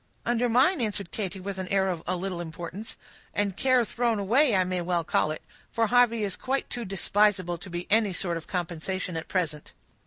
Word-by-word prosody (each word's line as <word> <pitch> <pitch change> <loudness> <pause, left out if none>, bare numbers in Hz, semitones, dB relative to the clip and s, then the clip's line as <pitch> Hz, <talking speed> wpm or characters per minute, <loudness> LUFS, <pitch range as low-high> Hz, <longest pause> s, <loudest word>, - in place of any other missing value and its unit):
"Under 240 +1 +1
mine," 260 +7 +4
answered 205 -5 -2
Katy, 195 -3 -3
with 190 0 -5
an 185 - -3
air 190 0 +2
of 175 -4 -2
a 185 - +1
little 180 -1 -3
importance. 175 +5 -7 0.4
"And 200 -2 0
care 255 +2 +3
thrown 235 0 0
away 235 +5 +3
I 185 - +4
may 180 0 -1
well 175 -1 0
call 155 - +1
it; 155 - -5 0.3
for 230 0 +2
Harvey 230 -1 +4
is 195 -2 -1
quite 270 +1 -1
too 240 -1 -3
despisable 195 -2 +2
to 185 - -9
be 175 0 -4
any 215 -2 +4
sort 175 -1 -2
of 165 - -9
compensation 180 +1 -3
at 165 - -4
present." 160 -5 -2
195 Hz, 205 wpm, -27 LUFS, 175-225 Hz, 0.4 s, mine